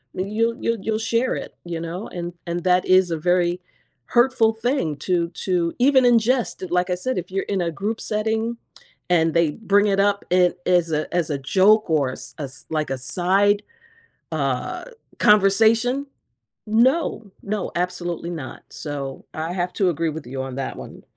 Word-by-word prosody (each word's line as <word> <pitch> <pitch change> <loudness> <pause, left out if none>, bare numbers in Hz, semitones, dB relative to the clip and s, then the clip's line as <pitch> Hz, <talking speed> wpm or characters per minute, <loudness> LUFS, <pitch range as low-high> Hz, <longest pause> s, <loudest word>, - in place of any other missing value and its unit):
And 195 +3 -3
you'll 230 +1 +1
you'll 230 -1 0
you'll 220 +2 -1
share 230 +3 0
it, - - -7
you 170 -1 -4
know? 170 +5 -5
And 175 -1 -6
and 170 0 -3
that 180 0 +3
is 185 -1 +4
a 165 - 0
very 175 +2 +1 0.4
hurtful 240 -2 +3
thing 225 - -1
to 170 +2 0
to 175 -1 -1
even 260 +1 +5
ingest, 240 -4 +2
like 180 +1 +1
I 180 - +1
said, 255 +7 -2
if 180 - -8
you're 195 +1 -1
in 195 -2 -1
a 170 - 0
group 210 +6 -3
setting 220 +2 -1 0.5
and 165 -2 +3
they 170 -2 +3
bring 205 +3 +2
it 195 -1 +1
up 200 0 +2
in 180 -1 +4
as 175 -2 +2
a 155 0 -2
as 175 -3 0
a 145 - -1
joke 195 +9 +4
or 150 -5 +2
a - - -5
s 130 - -9
s 140 -2 -7
like 155 -2 -1
a 135 - -1
side, 195 +9 +2 0.7
uh, - - -2 0.3
conversation, 225 +6 +4 0.6
no, 230 0 +2
no, 205 -1 -3
absolutely 175 -1 -2
not. 155 -7 -7
So, 140 -3 -6
I 160 +2 -3
have 180 0 -2
to 190 -3 +2
agree 165 0 -1
with 155 -2 -8
you 130 +2 -4
on 130 -1 -6
that 135 -1 -4
one. - - -10
180 Hz, 180 wpm, -22 LUFS, 170-220 Hz, 0.7 s, even